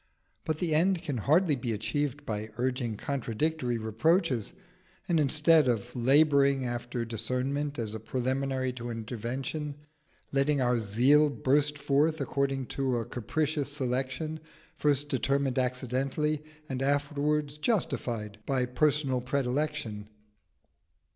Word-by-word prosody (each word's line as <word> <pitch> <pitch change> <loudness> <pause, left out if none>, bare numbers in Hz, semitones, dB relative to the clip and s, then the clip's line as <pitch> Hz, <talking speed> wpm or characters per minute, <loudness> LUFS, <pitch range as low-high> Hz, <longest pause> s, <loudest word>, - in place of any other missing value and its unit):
But 155 -1 -1
the 165 -1 0
end 175 +3 +2
can 140 -4 -2
hardly 155 - +3
be 120 -3 -2
achieved 145 +6 -2
by 110 0 -3
urging 125 -3 -1
contradictory 130 +1 -1
reproaches, 120 - +1 0.6
and 170 -4 +2
instead 150 +1 +4
of 120 +1 -1
labouring 140 +1 +4
after 120 0 -3
discernment 130 +6 -2
as 110 -3 -3
a 110 - -4
preliminary 130 +2 -1
to 120 -1 -6
intervention, 125 +6 -4 0.6
letting 140 +1 +2
our 125 -2 +2
zeal 130 +8 +4
burst 145 +1 +1
forth 150 +3 +2
according 135 -1 -1
to 130 -3 +1
a 115 - -2
capricious 145 +5 -2
selection, 135 +3 -2 0.4
first 145 -1 +1
determined 135 0 0
accidentally 130 +4 -1 0.3
and 130 -2 -3
afterwards 145 +1 0
justified 120 - -1
by 130 -2 +1
personal 135 0 +1
predilection. 130 -4 -2
135 Hz, 115 wpm, -29 LUFS, 120-150 Hz, 0.6 s, instead